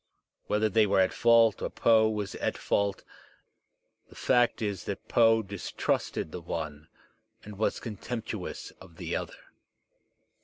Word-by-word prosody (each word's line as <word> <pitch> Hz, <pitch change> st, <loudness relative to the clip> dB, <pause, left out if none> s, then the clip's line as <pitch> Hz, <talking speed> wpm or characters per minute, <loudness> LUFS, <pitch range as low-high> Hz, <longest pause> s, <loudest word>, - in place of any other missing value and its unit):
Whether 105 Hz, +1 st, +2 dB
they 110 Hz, +1 st, +3 dB
were 100 Hz, 0 st, +3 dB
at 95 Hz, 0 st, +3 dB
fault 115 Hz, -2 st, +4 dB
or -, -, -2 dB
Poe 110 Hz, -1 st, +4 dB
was 105 Hz, -2 st, -3 dB
at -, -, -2 dB
fault, 100 Hz, -1 st, 0 dB, 1.1 s
the -, -, -16 dB
fact 120 Hz, -2 st, +2 dB
is 100 Hz, -4 st, -3 dB
that -, -, -5 dB
Poe 115 Hz, -1 st, +4 dB
distrusted 100 Hz, -4 st, -2 dB
the 90 Hz, -, -6 dB
one 75 Hz, -2 st, -5 dB, 0.6 s
and 105 Hz, 0 st, -9 dB
was 110 Hz, -, 0 dB
contemptuous 115 Hz, +1 st, -6 dB
of 90 Hz, -3 st, -14 dB
the -, -, -3 dB
other. -, -, -7 dB
105 Hz, 140 wpm, -29 LUFS, 95-115 Hz, 1.1 s, fault